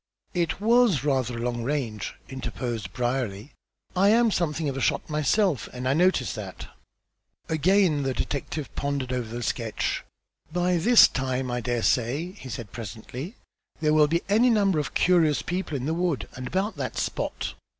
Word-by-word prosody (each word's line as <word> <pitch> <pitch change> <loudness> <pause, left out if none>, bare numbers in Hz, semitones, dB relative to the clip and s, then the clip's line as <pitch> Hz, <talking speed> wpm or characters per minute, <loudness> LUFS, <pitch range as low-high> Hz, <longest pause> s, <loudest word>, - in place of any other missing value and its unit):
"It 175 -2 0
was 225 - +4
rather 130 -4 0
a - - -4
long 120 0 -2
range," 120 -5 -3
interposed 120 -6 -4
Brierly. 120 -1 -2 0.4
"I 195 +2 +5
am 230 +1 +4
something 160 -4 0
of 135 - -2
a 135 - -3
shot - - 0
myself 155 - +1
and 125 0 -4
I 130 - +3
noticed 170 -5 +2
that." 100 -4 -7 0.8
Again 165 -1 +3
the 135 -2 -1
detective 145 +1 -3
pondered 140 -3 -2
over 125 -3 -2
the 120 - -4
sketch. 115 -1 -2 0.5
"By 180 +1 +1
this 230 +8 +7
time 130 -1 -2
I 120 0 -1
dare 120 -1 -1
say," 135 +9 +1
he 165 -10 -11
said 115 -3 -6
presently, 120 - -7 0.4
"there 155 -1 +2
will 155 -1 +5
be 170 +3 0
any 220 +5 +4
number 200 -7 +3
of 145 -4 -4
curious 165 -5 +3
people 175 -4 -2
in 130 - -4
the 160 - 0
wood 170 -4 -1
and 125 0 -5
about 195 - -1
that - - -4
spot." - - -2
145 Hz, 170 wpm, -26 LUFS, 125-180 Hz, 0.8 s, this